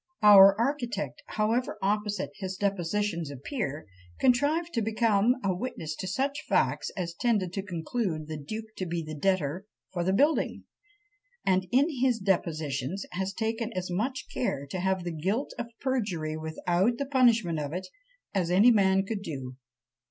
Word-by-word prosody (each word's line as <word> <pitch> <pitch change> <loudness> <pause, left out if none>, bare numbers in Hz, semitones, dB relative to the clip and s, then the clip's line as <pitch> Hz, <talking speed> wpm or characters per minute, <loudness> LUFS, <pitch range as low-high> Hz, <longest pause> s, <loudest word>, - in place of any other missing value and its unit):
Our 200 -1 +9
architect, 240 -5 -2
however 220 +2 0
opposite 205 0 -1
his 190 -2 -4
depositions 195 -3 -1
appear, 145 - -4 0.3
contrived 290 +7 +2
to 230 - +1
become 220 +1 +2
a 195 -1 +1
witness 175 -6 -4
to 185 - -4
such 275 +9 -1
facts - - +1
as 170 -2 -3
tended 195 -3 0
to 195 - -2
conclude 175 -2 -3
the 155 - -5
duke 215 +10 -6
to 185 - -3
be 170 0 -2
the 155 0 -7
debtor 180 +2 0 0.3
for 175 -2 -1
the 185 - +1
building; 290 +11 +2 0.8
and 185 -1 +2
"in 270 +4 +4
his 255 -3 +3
depositions 165 - -1
has 190 +1 -2
taken 225 +2 -2
as 185 -1 -3
much 245 +9 -2
care 140 - -1
to 185 - -3
have 190 0 0
the 175 - -3
guilt 190 - -2
of 240 - -3
perjury 200 - -1
without 175 +7 0
the 280 - -2
punishment 235 - +3
of 145 -1 -3
it, 180 +3 -4 0.5
as 185 -4 0
any 200 +7 +6
man 195 -3 +3
could 205 0 -3
do." 135 -8 -6
195 Hz, 160 wpm, -28 LUFS, 170-230 Hz, 0.8 s, Our